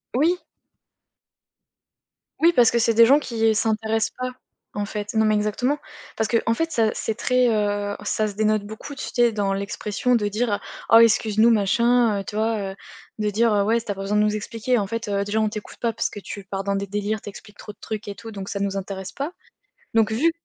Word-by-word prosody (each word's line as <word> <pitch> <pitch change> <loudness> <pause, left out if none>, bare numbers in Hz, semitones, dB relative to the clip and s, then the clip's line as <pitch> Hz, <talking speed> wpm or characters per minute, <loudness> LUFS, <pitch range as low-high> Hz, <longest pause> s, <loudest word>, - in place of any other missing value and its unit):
Oui! 335 +7 +2 2.0
Oui, 335 +1 +6
parce 240 -2 +6
que 235 - +2
c'est 230 0 +3
des 230 +1 +7
gens 275 +5 +6
qui 225 -5 +1
s'intéressent 220 0 0
pas, 255 0 -2 0.4
en 205 0 -2
fait. 210 0 -5
Non, 220 -1 +3
mais 215 0 +3
exactement. 215 +7 0 0.4
Parce 220 - +1
qu'en 230 -1 +1
fait 325 +7 -1
ça, 225 -2 +2
c'est 220 - -3
très, 250 +1 +2
heu, 205 -2 0
ça 215 +1 0
se 205 - -6
dénote 215 -1 +1
beaucoup, 220 +7 -8
tu - - -6
sais, 240 -1 +4
dans 200 -2 0
l'expression 205 +4 -1
de 210 -3 +1
dire: 210 0 -1 0.3
«Oh 225 - +8
excuse-nous 220 0 +5
machin», 230 +1 +3
heu, 195 - -4
tu 210 - -7
vois, 215 -3 -1
heu, - - -10 0.4
de 210 -1 +1
dire, 220 +2 +2
heu: 205 -1 +3
«Ouais, 225 +3 +2
s 235 - -5
tu - - -3
as - - -3
pas 195 - -7
besoin 200 +2 0
de 210 - +4
nous 210 0 +1
expliquer 230 +3 -1
en 200 -3 -1
fait, 230 +1 -4
heu, 200 -1 0
déjà 205 +2 -1
on 215 -1 +2
t'écoute 210 -1 -8
pas 235 -1 0
parce 230 - -1
que - - -8
tu 200 0 -8
pars 195 0 -4
dans 200 0 -1
des 195 0 -2
délires, 205 +1 -2
tu - - -7
expliques 205 +1 -13
trop 210 - -9
de - - -23
trucs 215 -1 -6
et 200 - -5
tout 225 +2 -9
donc 195 -2 -7
ça 200 - -3
nous 195 0 -1
intéresse 190 -1 -5
pas», 280 +4 -4 0.6
donc 220 -1 +3
vu 300 +10 +2
215 Hz, 230 wpm, -23 LUFS, 205-230 Hz, 2.0 s, Oh